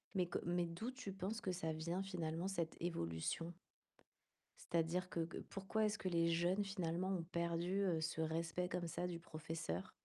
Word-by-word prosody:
Mais 180 -2 +3
que - - -1
mais 175 0 +3
d'où, 195 +9 -3
tu 250 -6 -5
penses 195 +4 -2
que 185 - 0
ça 160 -3 0
vient, 170 +4 -1
finalement, 170 -2 -1
cette 170 -4 -1
évolution? 165 - -1 1.2
C'est-à-dire 170 +2 +2
que 170 - -2
que 165 +1 -3
pourquoi 200 +3 +1
est-ce 210 0 +1
que 185 - -1
les 170 -1 +4
jeunes 175 +4 +3
finalement 185 -2 0
ont 180 -4 0
perdu, 170 +3 +1
heu, 170 -4 +3
ce 160 0 0
respect 165 +2 0
comme 175 -1 -1
ça 175 +2 -1
du 175 -1 -3
professeur? 155 - -3
175 Hz, 180 wpm, -41 LUFS, 165-185 Hz, 1.2 s, les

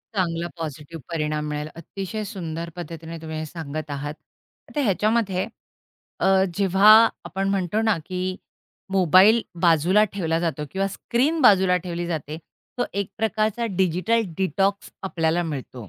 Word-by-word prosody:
चांगला 170 -3 0
पॉझिटिव्ह 155 0 -7
परिणाम 150 -1 -1
मिळेल. 150 0 -3
अतिशय 195 +5 -5
सुंदर 170 -5 -5
पद्धतीने 165 -1 -7
तुम्ही 160 -1 -6
हे 155 - -3
सांगत 155 -1 -6
आहात. 145 +1 -4 0.6
तर 295 - +1
ह्याच्यामध्ये 210 -3 +1 0.7
अ, - - +2 0.3
जेव्हा 195 +2 +5 0.3
आपण 195 +1 -2
म्हणतो 195 +1 0
ना, 220 -4 +2
की 185 0 -3 0.6
मोबाईल 195 +5 +6 0.2
बाजूला 175 +5 +4
ठेवला 165 -5 0
जातो 165 -3 -2
किंवा 195 +1 -1
स्क्रीन 255 +10 0
बाजूला 190 -6 +6
ठेवली 175 -1 -4
जाते. 155 -2 -4 0.4
तो 245 - +2
एक 200 -1 -2
प्रकारचा 220 +1 0
डिजिटल 190 +6 +2
डिटॉक्स 195 +2 0
आपल्याला 170 -2 0
मिळतो. 130 - -6
180 Hz, 130 wpm, -24 LUFS, 160-200 Hz, 0.7 s, मोबाईल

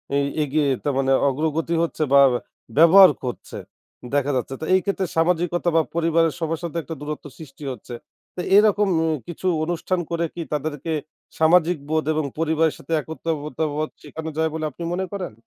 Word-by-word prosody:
এ - - +3 0.3
এগিয়ে, 145 +1 +1 0.2
তা 145 - 0
মানে 135 0 +1 0.2
অগ্রগতি 160 +4 -1
হচ্ছে 160 -2 -2
বা 140 - +8 0.6
ব্যবহার 185 +4 +9
করছে, 125 -2 -6 0.6
দেখা 145 0 +1
যাচ্ছে। 130 +1 -2
তো - - -3
এই - - +5
ক্ষেত্রে 195 -1 0
সামাজিকতা 175 +1 +1
বা 165 - +6
পরিবারের 165 -1 +2
সবার 165 -1 -2
সাথে 170 0 -4
একটা 165 - -6
দূরত্ব 150 0 -6
সৃষ্টি 150 -2 -12
হচ্ছে। 120 0 -9 0.4
তো 180 - -3 0.2
এরকম 210 -1 +4 0.2
উম 160 -1 +1
কিছু, 175 +2 -4 0.2
অনুষ্ঠান 175 +2 -1
করে 170 0 0
কি, 170 - -4
তাদেরকে 150 +1 -3 0.5
সামাজিক 170 +1 +4
বোধ 155 -1 0
এবং 155 -1 -1
পরিবারের 160 -1 +1
সাথে 150 - -12
একত্রতা 155 -1 -4
বোধ, 155 +1 -1
শেখানো 160 0 -6
যায় 160 0 +2
বলে 160 -1 -3
আপনি 170 - -8
মনে 190 +1 -1
করেন? 185 - -4
160 Hz, 170 wpm, -22 LUFS, 150-170 Hz, 0.6 s, ব্যবহার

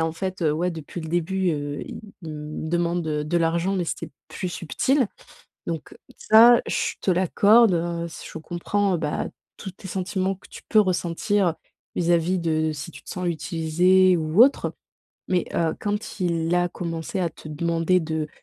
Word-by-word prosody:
en 160 0 0
fait, 185 +3 -4
heu, 155 -3 +2
ouais, 175 +4 0
depuis 165 +1 -7
le 160 - -6
début, 180 +2 0
heu, 145 -2 -3
il - - -8 0.2
me 155 -1 -6
demande 175 0 0
de 150 -2 -2
de 150 +3 -1
l'argent, 170 +3 +1
mais 180 - 0
c'était - - -4 0.2
plus 185 - -4
subtil», 250 - 0 0.6
donc 165 -3 -5 0.2
ça, 235 +2 +7
je - - -1
te - - +1
l'accorde, 200 +4 +5
heu, 170 0 -2 0.2
je - - -7
comprends, 180 +4 -1
bah, 150 -3 -2 0.3
tous 195 - -6
tes 190 - -12
sentiments 190 +1 -1
que 190 - -18
tu - - -11
peux 215 - +6
ressentir, 185 0 +1 0.4
vis-à-vis 175 +1 +2
de 160 -2 0
si 150 +2 -7
tu - - -13
sens 180 0 -4
utiliser 175 +3 +3
ou 160 +6 +4
autre 275 +3 +3 0.6
mais, 180 -2 +1
heu, 165 -1 +1
quand 205 0 -3
il 170 -2 0
a 175 0 +2
commencé 165 +1 -4
à 175 -3 0
te 155 - -12
demander 165 +3 +1
de 160 -2 -3
170 Hz, 170 wpm, -24 LUFS, 160-185 Hz, 0.6 s, ça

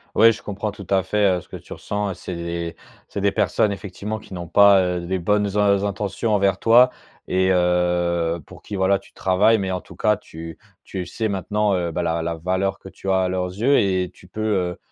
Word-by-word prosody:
Ouais, 115 +1 +7
je 110 - -7
comprends 105 +1 -4
tout 100 -2 -11
à 95 -1 +3
fait, 95 -1 +2
heu, - - -6
ce - - -20
que - - -7
tu - - -10
ressens 105 -1 -3
et - - -4
c'est 90 -1 -7
des 85 0 -4 0.3
c'est - - -5
des - - +2
personnes 105 - +1
effectivement 100 +2 -5
qui 100 - -13
n'ont 85 -1 -6
pas, 100 +2 +6
heu, 90 -1 -1
des 95 +1 -1
bonnes 105 +2 +1
in 100 -1 +3
intentions 100 +2 -2
envers 100 -2 +2
toi 120 +2 +6 0.4
et 95 0 +2
heu, 90 -1 +1
pour - - -13
qui, 105 - -7
voilà, 95 +1 +2
tu - - -21
travailles. 100 +4 +3
Mais 95 -2 -2
en 90 - -2
tout - - -15
cas, 105 -1 +2
tu 80 -4 -10 0.3
tu 95 -2 -5
sais 110 +6 -3
maintenant, 100 +1 0
heu, 85 -2 -1
bah 90 +2 -2
la 85 0 0
la 85 0 -2
valeur 95 +3 -1
que - - -11
tu 95 - -7
as 95 - +3
à 95 - +1
leurs 90 0 -1
yeux 120 +10 +2
et 95 -2 +1
tu 90 - -18
peux, 105 +5 -7
heu, 95 -5 0
95 Hz, 235 wpm, -22 LUFS, 90-105 Hz, 0.4 s, Ouais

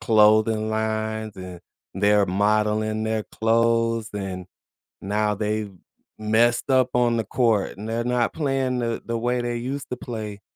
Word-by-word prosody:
clothing 110 0 +4
lines 110 -1 -2
and 90 -2 -8 0.3
they're 100 +1 +3
modeling 105 +2 +1
their 110 -1 -1
clothes, 115 0 +1
and 95 -2 -5 0.6
now 105 +1 0
they've 105 -1 -2 0.5
messed 115 +4 +2
up 130 -1 +4
on 120 -1 +2
the 110 - 0
court 110 -3 0
and 105 +2 -7
they're 115 +1 -1
not 125 -1 0
playing 135 -4 -1
the 115 -1 -2
the 115 0 -2
way 120 +1 0
they 120 0 -2
used 135 +4 -5
to - - -1
play, 110 -4 -6
110 Hz, 150 wpm, -24 LUFS, 105-120 Hz, 0.6 s, clothing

